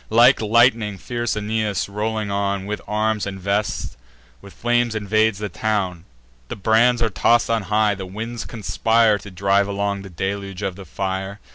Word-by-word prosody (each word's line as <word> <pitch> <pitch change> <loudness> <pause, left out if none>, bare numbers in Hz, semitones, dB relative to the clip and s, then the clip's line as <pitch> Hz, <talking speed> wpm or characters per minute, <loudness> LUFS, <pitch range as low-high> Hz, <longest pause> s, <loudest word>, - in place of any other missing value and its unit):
Like 120 +4 +5
lightning, 115 -2 +3
fierce 120 +2 -3
Aeneas, 105 -1 -1
rolling 105 +1 -2
on, 100 -1 -1
With 105 +1 -4
arms 105 0 0
invests, 100 -2 -2 0.4
with 100 - -12
flames 120 0 0
invades 110 0 +1
the 105 +1 -3
town: 95 -4 -2 0.4
The - - -5
brands 115 +4 +3
are 115 - +1
toss'd 115 +4 +3
on 115 -1 +1
high; 105 -1 +3
the 95 -2 -7
winds 115 +5 -5
conspire 110 -1 +2
To 100 - -10
drive 100 +2 +1
along 100 0 -2
the 95 - -10
deluge 95 +2 -4
of 95 -2 -2
the 95 0 -10
fire. 95 +1 -4
105 Hz, 160 wpm, -21 LUFS, 100-110 Hz, 0.4 s, Like